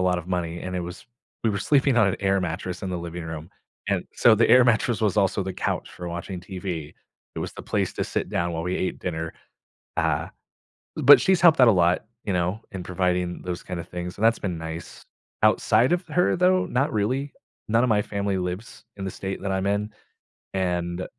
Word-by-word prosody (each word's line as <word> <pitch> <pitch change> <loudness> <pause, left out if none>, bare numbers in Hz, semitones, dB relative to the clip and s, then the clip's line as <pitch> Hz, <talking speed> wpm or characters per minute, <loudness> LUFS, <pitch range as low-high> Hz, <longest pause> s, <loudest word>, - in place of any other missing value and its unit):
lot 90 -1 +2
of 90 0 -9
money, 85 -2 -2
and 90 - -5
it - - -1
was 90 0 -8 0.4
we 115 - +2
were 105 - 0
sleeping 140 -1 +3
on 110 - +5
an 95 - 0
air 100 0 +2
mattress 90 0 -4
in 95 - -3
the 90 - -2
living 85 0 -6
room, 80 0 -6 0.4
and - - 0
so 115 - +5
the 115 +2 +4
air 125 - +8
mattress 120 -2 +2
was 105 -3 +1
also 100 -1 +2
the 95 0 -5
couch - - -2
for 90 - -8
watching 85 +2 -5
TV. 90 -4 -6 0.4
It - - -5
was - - -4
the - - -8
place - - -1
to - - -1
sit - - -2
down 85 0 -1
while 80 0 -3
we 90 +2 -1
ate 95 - -2
dinner. 80 -2 -4 0.6
Uh, - - 0 0.7
but 145 +3 +8
she's 190 -2 +3
helped 165 -5 +6
out 125 - +8
a - - +7
lot, 90 0 +2 0.2
you 100 - -1
know, 90 +4 0
in 95 -3 -6
providing 90 -1 -1
those 90 0 -4
kinda 85 -2 -5
things, 90 0 -6
and 105 - +1
that's 115 0 +4
been 90 -4 -3
nice. 80 0 -8 0.4
Outside 110 +4 +4
of 180 +1 -1
her, 180 +3 +2
though, 185 +1 +3
not 135 +4 0
really. 130 +6 -1 0.4
None 115 +2 +3
of 125 - +2
my 105 -2 +3
family 100 -1 -2
lives 90 +4 -5
in 95 - -5
the 95 - -3
state 95 +1 -5
that 100 - -2
I'm 95 0 -1
in, 105 +1 -1 0.6
and 90 -1 -1
95 Hz, 215 wpm, -25 LUFS, 90-110 Hz, 0.7 s, air